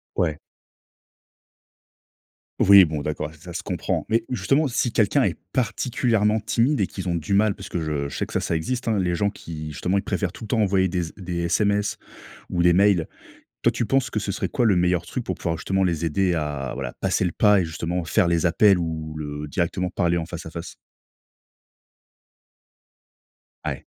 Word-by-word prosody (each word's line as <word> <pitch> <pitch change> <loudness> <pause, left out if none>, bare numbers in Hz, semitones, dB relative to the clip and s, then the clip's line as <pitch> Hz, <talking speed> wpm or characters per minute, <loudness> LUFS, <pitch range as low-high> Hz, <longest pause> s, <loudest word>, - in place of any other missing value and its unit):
Ouais. 80 -3 0 2.3
Oui 100 -2 +10
bon, 80 -2 -3
d'accord 75 +1 -3
ça 85 +2 -11
se - - -3
comprend. - - -2
Mais 115 0 +2
justement, 135 +3 +1
si 120 -1 0
quelqu'un 115 +6 +3
est - - 0 0.2
particulièrement 115 -3 +1
timide 120 +4 +1
et - - +2
qu'ils 95 -2 -6
ont 85 - 0
du 85 +3 -3
mal, 100 0 +3
parce - - -10
que 85 - -2
je 75 -3 -2
je - - -8
sais - - -1
que - - -2
ça - - -2
existe, 120 +11 -2
hein, 110 -3 +1
les 90 -2 0
gens 100 +3 +1
qui 80 -5 -7
justement 90 +6 -1
ils 100 - +1
préfèrent 90 -3 -1
tout 110 - -10
le 110 - -9
temps 115 - +1
envoyer 95 -2 +3
des 90 0 -1
z 80 - -8
des 90 -2 -5
SMS 100 +4 +1 0.5
ou 85 - 0
des 85 - +6
mails. 95 -2 +3 0.6
Toi, - - +4
tu 120 - -2
penses 135 0 +1
que 105 - -1
ce 100 -1 -3
serait 95 -1 -3
quoi 120 +6 +1
le 100 - +4
meilleur 90 -1 +2
truc - - -5
pour - - -3
pouvoir 80 -1 -3
justement 95 0 0
les 85 -2 0
aider 90 +2 +1
à, 75 -4 -3
voilà, 65 -2 -4
passer - - +1
le 85 - 0
pas 105 -2 +4
et 90 - 0
justement 85 +2 -3
faire 85 - +2
les 85 0 +1
appels 95 +3 +5
ou 80 -2 -4
le 75 0 -5
directement 90 +4 -1
parler 85 0 +1
en 80 - -2
face 85 -2 -7
à 80 - -8
face. 85 0 -7 2.9
Ah, - - -1
ouais. - - -10
90 Hz, 200 wpm, -24 LUFS, 80-105 Hz, 2.9 s, Oui